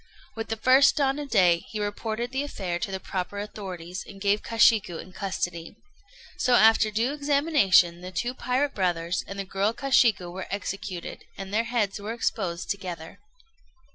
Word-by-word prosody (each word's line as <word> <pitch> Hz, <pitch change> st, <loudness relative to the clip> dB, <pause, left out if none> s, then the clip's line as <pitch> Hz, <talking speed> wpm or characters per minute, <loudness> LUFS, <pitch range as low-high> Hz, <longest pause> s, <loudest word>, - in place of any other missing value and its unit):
With 225 Hz, 0 st, -4 dB
the 225 Hz, -, -2 dB
first 255 Hz, +5 st, +5 dB
dawn 275 Hz, 0 st, +1 dB
of 290 Hz, -1 st, -6 dB
day, 180 Hz, -7 st, +4 dB
he 215 Hz, -, -5 dB
reported 220 Hz, +3 st, -3 dB
the 265 Hz, +1 st, -1 dB
affair 190 Hz, -11 st, -4 dB
to 220 Hz, -, -3 dB
the 190 Hz, -, -3 dB
proper 190 Hz, +1 st, -4 dB
authorities, 190 Hz, -3 st, -6 dB
and 195 Hz, -, -12 dB
gave 205 Hz, +1 st, +1 dB
Kashiku 220 Hz, -6 st, +3 dB
in 185 Hz, -, -10 dB
custody. 175 Hz, -3 st, -4 dB, 0.6 s
So, 250 Hz, -1 st, +3 dB
after 220 Hz, -1 st, +5 dB
due 230 Hz, +6 st, 0 dB
examination, 280 Hz, -, +3 dB
the 180 Hz, -, -7 dB
two 240 Hz, +8 st, -2 dB
pirate 260 Hz, +3 st, -1 dB
brothers 175 Hz, -2 st, -1 dB
and 195 Hz, -, -7 dB
the 195 Hz, -, -3 dB
girl 195 Hz, +3 st, 0 dB
Kashiku 230 Hz, -9 st, +2 dB
were 190 Hz, +1 st, -6 dB
executed, 195 Hz, -2 st, -5 dB
and 195 Hz, 0 st, -7 dB
their 225 Hz, +2 st, +2 dB
heads 230 Hz, -4 st, -1 dB
were 210 Hz, +3 st, -4 dB
exposed 190 Hz, -7 st, -2 dB
together. 180 Hz, -5 st, -6 dB
205 Hz, 170 wpm, -26 LUFS, 185-235 Hz, 0.6 s, first